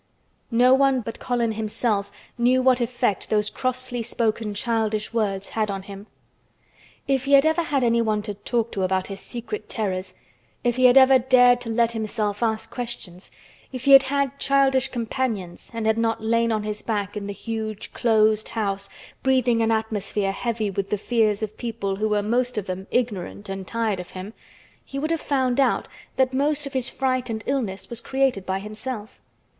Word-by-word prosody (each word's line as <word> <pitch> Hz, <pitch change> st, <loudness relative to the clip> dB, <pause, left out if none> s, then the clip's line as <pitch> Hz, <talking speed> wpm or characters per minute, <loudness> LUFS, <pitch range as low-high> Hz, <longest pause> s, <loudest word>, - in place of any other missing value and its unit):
No 250 Hz, +2 st, +5 dB
one 270 Hz, -1 st, +4 dB
but 225 Hz, 0 st, -7 dB
Colin 240 Hz, -2 st, 0 dB
himself 215 Hz, -1 st, -1 dB, 0.2 s
knew 255 Hz, +1 st, +3 dB
what 255 Hz, -1 st, +4 dB
effect 240 Hz, -4 st, -1 dB
those 210 Hz, -1 st, +1 dB
crossly 255 Hz, -1 st, -2 dB
spoken 225 Hz, -2 st, -1 dB
childish 220 Hz, -1 st, -1 dB
words 200 Hz, -4 st, -1 dB
had 215 Hz, -1 st, -1 dB
on 195 Hz, -1 st, -4 dB
him. 200 Hz, +1 st, -10 dB, 1.0 s
If 270 Hz, -1 st, +1 dB
he 280 Hz, -, +1 dB
had 275 Hz, +1 st, +7 dB
ever 320 Hz, +2 st, +3 dB
had 290 Hz, -5 st, 0 dB
anyone 230 Hz, -3 st, +2 dB
to 210 Hz, -1 st, -4 dB
talk 230 Hz, +3 st, -2 dB
to 195 Hz, -, -3 dB
about 185 Hz, 0 st, +1 dB
his 195 Hz, -1 st, -7 dB
secret 240 Hz, -, -6 dB
terrors—if 195 Hz, +4 st, -4 dB
he 255 Hz, 0 st, +3 dB
had 250 Hz, +1 st, +7 dB
ever 265 Hz, 0 st, +7 dB
dared 245 Hz, -1 st, +5 dB
to 230 Hz, -, -5 dB
let 230 Hz, 0 st, +2 dB
himself 215 Hz, -2 st, -2 dB
ask 225 Hz, -1 st, -1 dB
questions—if 240 Hz, +2 st, -9 dB
he 280 Hz, -, +3 dB
had 275 Hz, 0 st, +11 dB
had 280 Hz, 0 st, -1 dB
childish 270 Hz, -1 st, +3 dB
companions 230 Hz, -7 st, -3 dB
and 230 Hz, -2 st, -4 dB
had 220 Hz, +1 st, +2 dB
not 225 Hz, -1 st, 0 dB
lain 230 Hz, +1 st, +2 dB
on 215 Hz, -1 st, 0 dB
his 210 Hz, 0 st, -4 dB
back 205 Hz, -3 st, -2 dB
in 205 Hz, -1 st, -4 dB
the -, -, -3 dB
huge 220 Hz, 0 st, -5 dB
closed 220 Hz, -2 st, +3 dB
house, 200 Hz, -3 st, -2 dB, 0.3 s
breathing 255 Hz, -3 st, +2 dB
an 225 Hz, -, +2 dB
atmosphere 210 Hz, -3 st, -1 dB
heavy 220 Hz, 0 st, -2 dB
with 195 Hz, 0 st, -3 dB
the 210 Hz, -, 0 dB
fears 215 Hz, -1 st, +1 dB
of 215 Hz, 0 st, -5 dB
people 220 Hz, -5 st, -3 dB
who 215 Hz, +1 st, 0 dB
were 210 Hz, -1 st, +1 dB
most 245 Hz, +3 st, 0 dB
of 210 Hz, -, -1 dB
them 190 Hz, 0 st, -5 dB
ignorant 210 Hz, -4 st, -2 dB
and 195 Hz, -1 st, -5 dB
tired 225 Hz, -4 st, -1 dB
of 180 Hz, -, -7 dB
him, 190 Hz, +3 st, -8 dB, 0.5 s
he 275 Hz, -, -8 dB
would 310 Hz, +3 st, -1 dB
have 330 Hz, -, 0 dB
found 260 Hz, -2 st, 0 dB
out 275 Hz, -, +2 dB, 0.3 s
that 260 Hz, -1 st, +2 dB
most 290 Hz, +2 st, +1 dB
of 280 Hz, -, -7 dB
his 260 Hz, -1 st, 0 dB
fright 255 Hz, -2 st, -1 dB
and 220 Hz, -1 st, -4 dB
illness 230 Hz, -9 st, -2 dB
was 235 Hz, 0 st, -4 dB
created 265 Hz, -7 st, 0 dB
by 190 Hz, 0 st, 0 dB
himself. 215 Hz, +2 st, -7 dB
230 Hz, 180 wpm, -24 LUFS, 210-255 Hz, 1.0 s, had